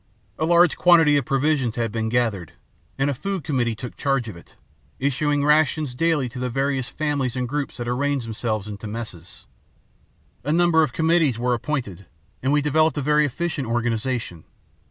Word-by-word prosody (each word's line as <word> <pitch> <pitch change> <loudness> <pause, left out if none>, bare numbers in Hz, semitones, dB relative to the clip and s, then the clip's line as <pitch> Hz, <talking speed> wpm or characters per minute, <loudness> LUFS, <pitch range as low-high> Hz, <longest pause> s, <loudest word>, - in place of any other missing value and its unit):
"A 160 - +1
large 175 +1 +4
quantity 165 -4 +5
of 140 - -1
provisions 135 -3 +1
had 115 -3 -1
been 110 0 -2
gathered, 110 -8 -1 0.4
and 135 +1 +1
a 145 - +1
food 195 +5 -4
committee 125 -6 0
took 120 +3 -8
charge 135 -4 0
of 105 - -8
it, 85 - -16 0.4
issuing 145 +2 0
rations 150 -2 +2
daily 155 -1 +1
to 125 - -8
the 125 0 -2
various 135 0 -1
families 145 -5 -2
and 125 -1 -2
groups 145 +2 -3
that 120 - -5
arranged 135 +1 -1
themselves 110 -2 -3
into 105 +1 -7
messes. 105 -6 -8 1.0
A 145 - -1
number 170 0 +4
of 155 - +1
committees 160 -3 +2
were 125 +1 0
appointed, 115 - -4 0.3
and 130 - 0
we 145 0 +2
developed 155 +2 +2
a - - 0
very 150 +1 +3
efficient 160 -1 -3
organization. 115 -6 -2
135 Hz, 175 wpm, -23 LUFS, 120-150 Hz, 1.0 s, quantity